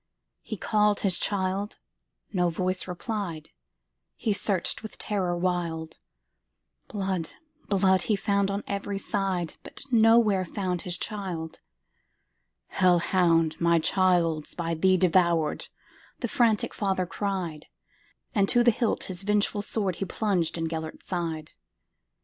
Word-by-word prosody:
He 215 - -6
called 210 +1 +2
his 190 -4 +2
child,—no 190 -1 -3
voice 185 +3 -1
replied,—He 160 - -6
searched 200 -3 -1
with 220 - -8
terror 185 -4 -1
wild; 170 -3 -2 0.9
Blood, 190 -5 -3 0.4
blood, 190 -2 +3
he 215 - +1
found 200 -1 +1
on 200 +1 -2
every 200 0 -3
side, 190 -4 -2
But - - -11
nowhere 225 -4 +5
found 180 -1 -3
his 180 -1 -2
child."Hell 180 -6 -5 1.4
hound! 170 -2 +2
my 170 0 +4
child 165 -3 +2
's - - -8
by 165 -1 -2
thee 185 +3 +3
devoured,"The 170 -4 0
frantic 230 -5 +2
father 190 -3 0
cried; 185 -5 -3 0.7
And 200 -4 +3
to 240 - +4
the 240 - +6
hilt 230 0 0
his 185 -1 -5
vengeful 205 0 +1
swordHe 195 -3 -2
plunged 185 -7 0
in 165 0 -1
Gêlert's 160 -1 -5
side. 165 -4 -3
185 Hz, 115 wpm, -27 LUFS, 170-200 Hz, 1.4 s, the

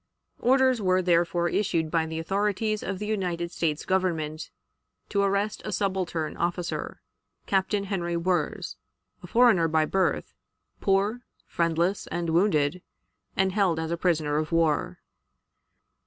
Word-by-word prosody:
Orders 260 -2 +3
were 185 -1 +2
therefore 175 0 +2
issued 165 -5 0
by 165 -1 +1
the 160 0 -5
authorities 205 +5 0
of 195 0 -3
the 210 - -4
United 180 -5 -2
States 155 -4 -1
Government 165 -5 -1 0.6
to 200 - +1
arrest 200 +1 0
a 215 - -4
subaltern 185 -5 -1
officer, 175 0 -3 0.4
Captain 195 +1 +1
Henry 175 -4 -2
Wirz, 170 -3 -1 0.4
a 180 - -10
foreigner 225 -5 +4
by 160 -1 +2
birth, 190 +4 0 0.5
poor, 200 +5 +1 0.2
friendless, 170 +3 0
and 170 -1 -2
wounded, 170 -2 +2 0.6
and 190 0 +2
held 185 -4 +2
as 160 0 -3
a - - +1
prisoner 155 -4 +1
of 155 +1 -3
war. 165 -2 +1
180 Hz, 130 wpm, -26 LUFS, 165-200 Hz, 0.6 s, foreigner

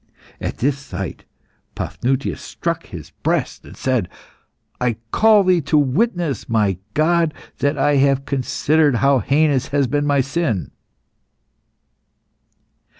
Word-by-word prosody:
At - - -4
this 140 +2 0
sight 95 - -7 0.5
Paphnutius 135 +2 -2
struck - - -4
his - - -9
breast - - -1
and - - -13
said 130 -8 0 0.7
"I 125 -2 0 0.2
call 215 -2 +5
Thee 180 -2 +3
to 150 +2 +1
witness, 150 - 0
my 105 -5 +1 0.2
God, 165 0 +2 0.2
that 145 +1 +1
I 145 +1 +3
have 135 0 +2
considered 145 +2 +1
how 135 +2 +3
heinous 140 +2 +2
has 140 -1 +1
been 145 +3 0
my 140 -1 +3
sin." 135 - -2
140 Hz, 120 wpm, -20 LUFS, 130-155 Hz, 0.7 s, call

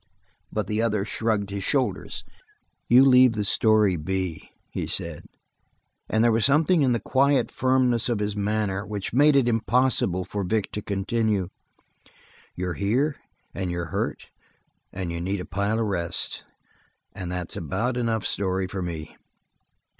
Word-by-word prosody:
But 105 -2 -1
the 105 +3 -1
other 105 -3 0
shrugged 110 -3 -1
his 100 -1 -4
shoulders. - - -1 0.7
"You 125 +3 +7
leave 130 -2 +6
the 105 -2 -1
story 105 -2 +3
be," 90 +1 -3 0.2
he - - -3
said, - - -3 0.8
and 110 +1 +2
there 120 - +5
was 115 0 +2
something 155 +4 +3
in 130 -3 +3
the 120 - +1
quiet 135 0 +2
firmness 130 -2 +2
of 120 - +1
his 105 0 -2
manner 105 -1 -1
which 105 -2 -5
made 145 +3 +5
it 135 -3 +4
impossible 115 -5 +2
for 100 -1 -3
Vic 105 +3 -1
to 105 - -4
continue. 100 -1 -1 1.1
"You're 90 0 -3
here 125 - 0 0.4
and 95 -2 -3
you're 85 -1 -4
hurt - - -3 0.6
and 90 -2 -4
you 85 0 -4
need 95 +3 -2
a 90 - -5
pile 100 +4 -1
of 115 - +1
rest. 85 -5 -2 0.7
That's 90 -1 -4
about 105 - -2
enough 115 -3 -1
story 95 -1 -1
for 95 +1 -5
me." 80 -3 -6
105 Hz, 150 wpm, -25 LUFS, 95-120 Hz, 1.1 s, You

